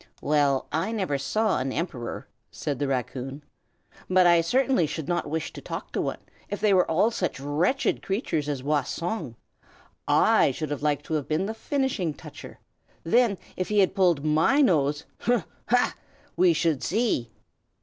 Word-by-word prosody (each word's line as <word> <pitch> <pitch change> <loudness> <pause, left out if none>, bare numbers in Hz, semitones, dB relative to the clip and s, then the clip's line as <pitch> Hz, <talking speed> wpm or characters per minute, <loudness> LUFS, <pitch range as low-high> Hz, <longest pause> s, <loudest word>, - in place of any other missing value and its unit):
"Well, 145 -3 +2
I 170 +8 -1
never 185 -11 -1
saw 210 - +1
an 130 +1 -2
Emperor," 130 -6 -4 0.2
said 140 -4 -4
the 145 - 0
raccoon; 135 +2 -3 0.7
"but 185 0 +5
I 170 -1 +6
certainly 255 - +2
should 155 0 -5
not 175 -3 -1
wish 160 +1 -3
to - - -9
talk - - -6
to - - -1
one, - - -2 0.3
if 205 - -3
they 210 - +3
are 185 -2 +4
all 185 +8 +3
such 180 - -2
wretched 155 - 0
creatures 190 - -2
as 135 -3 -3
Wah 145 +1 +2
Song. 165 - -4 0.7
I - - +4
should 145 -3 -4
like 145 -1 0
to - - -5
have 150 -3 -1
been 160 +5 0
the 220 - -3
Finishing 225 - -1
Toucher; - - -11 0.5
then 225 +2 +3 0.2
if 185 - -3
he 210 - 0
had 195 -2 +4
pulled 175 -7 +2
my 160 - +3
nose 150 - +2
hum! 240 -5 +1 0.2
ha! 245 0 +3 0.4
we 180 -1 +5
should 160 -3 +1
see!" 205 - 0
165 Hz, 170 wpm, -26 LUFS, 145-200 Hz, 0.7 s, I